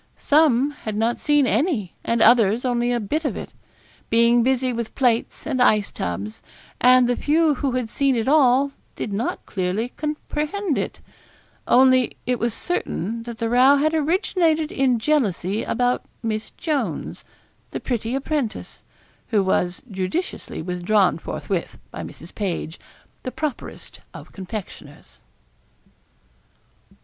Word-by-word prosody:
Some 285 Hz, -2 st, +3 dB
had 220 Hz, -7 st, -6 dB
not 230 Hz, +2 st, 0 dB
seen 295 Hz, -2 st, +3 dB
any, 235 Hz, -, 0 dB
and 230 Hz, 0 st, +2 dB
others 230 Hz, 0 st, +5 dB
only 240 Hz, -1 st, +1 dB
a 240 Hz, -, +1 dB
bit 295 Hz, +10 st, -2 dB
of 290 Hz, -, -2 dB
it, -, -, -8 dB, 0.6 s
being 235 Hz, +1 st, +4 dB
busy 255 Hz, 0 st, +1 dB
with 235 Hz, -1 st, -5 dB
plates 240 Hz, -4 st, 0 dB
and 270 Hz, -4 st, -1 dB
ice 215 Hz, -4 st, +3 dB
tubs; 100 Hz, +5 st, -5 dB, 0.4 s
and 250 Hz, 0 st, +6 dB
the 245 Hz, -, +1 dB
few 310 Hz, +3 st, +2 dB
who 270 Hz, -1 st, -2 dB
had 250 Hz, -2 st, -1 dB
seen 275 Hz, +3 st, +1 dB
it 225 Hz, 0 st, -1 dB
all 275 Hz, -1 st, +4 dB, 0.2 s
did 210 Hz, -, -4 dB
not 220 Hz, +5 st, -2 dB
clearly 190 Hz, +5 st, -2 dB
comprehend 305 Hz, +4 st, -3 dB
it -, -, -4 dB, 0.7 s
only 255 Hz, -1 st, +4 dB
it 250 Hz, -2 st, 0 dB
was 235 Hz, -1 st, -1 dB
certain 230 Hz, -, -2 dB
that 235 Hz, -, -7 dB
the 230 Hz, -, -1 dB
row 255 Hz, +4 st, +6 dB
had 305 Hz, +3 st, +2 dB
originated 320 Hz, -1 st, +1 dB
in 260 Hz, -3 st, +2 dB
jealousy 220 Hz, -, 0 dB
about 245 Hz, +1 st, 0 dB, 0.2 s
Miss 215 Hz, -1 st, -2 dB
Jones, 300 Hz, -4 st, -2 dB, 0.5 s
the -, -, -4 dB
pretty 240 Hz, -1 st, -2 dB
apprentice, 275 Hz, -4 st, -3 dB, 0.5 s
who 210 Hz, -4 st, +2 dB
was 180 Hz, -1 st, 0 dB
judiciously 190 Hz, -, -3 dB
withdrawn 180 Hz, +1 st, +1 dB
forthwith -, -, -4 dB
by -, -, -6 dB
Mrs. 165 Hz, -, -10 dB
Page, 175 Hz, -5 st, -3 dB, 0.4 s
the 255 Hz, -, -5 dB
properest 300 Hz, -3 st, -5 dB, 0.2 s
of -, -, -11 dB
confectioners. 185 Hz, -6 st, -9 dB
245 Hz, 135 wpm, -22 LUFS, 215-285 Hz, 0.7 s, and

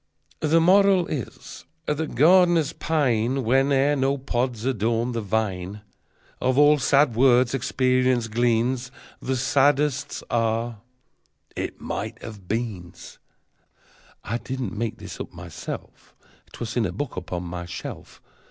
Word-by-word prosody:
The 160 Hz, +2 st, +3 dB
Moral 190 Hz, +1 st, +5 dB
is 140 Hz, -9 st, -7 dB, 0.2 s
that 150 Hz, -1 st, -2 dB
gardeners 170 Hz, +1 st, +5 dB
pine 130 Hz, -6 st, 0 dB
Whene'er 135 Hz, +3 st, +3 dB
no 135 Hz, 0 st, +1 dB
pods 125 Hz, -3 st, -2 dB
adorn 115 Hz, -1 st, 0 dB
the 115 Hz, -1 st, -2 dB
vine. 100 Hz, -2 st, -2 dB, 0.6 s
Of 130 Hz, +1 st, +1 dB
all 145 Hz, +1 st, +6 dB
sad 140 Hz, -2 st, +3 dB
words 125 Hz, 0 st, +4 dB
experience 130 Hz, -2 st, +1 dB
gleans 120 Hz, +2 st, 0 dB, 0.3 s
The 130 Hz, -, -1 dB
saddest 140 Hz, +1 st, +1 dB
are: 115 Hz, -1 st, 0 dB, 0.8 s
"It -, -, -4 dB
might 110 Hz, +4 st, -5 dB
have 105 Hz, -5 st, -9 dB
beans." 105 Hz, -6 st, -5 dB, 1.0 s
(I 115 Hz, +3 st, -3 dB
did 130 Hz, +1 st, -6 dB
not 125 Hz, -, -3 dB
make 115 Hz, 0 st, -3 dB
this -, -, -9 dB
up -, -, -6 dB
myself: -, -, -9 dB, 0.4 s
'Twas 115 Hz, -1 st, -5 dB
in 120 Hz, -3 st, +1 dB
a -, -, -5 dB
book 145 Hz, -, -5 dB
upon 90 Hz, -1 st, -4 dB
my 85 Hz, 0 st, -6 dB
shelf. 85 Hz, -, -8 dB
125 Hz, 125 wpm, -24 LUFS, 115-140 Hz, 1.0 s, all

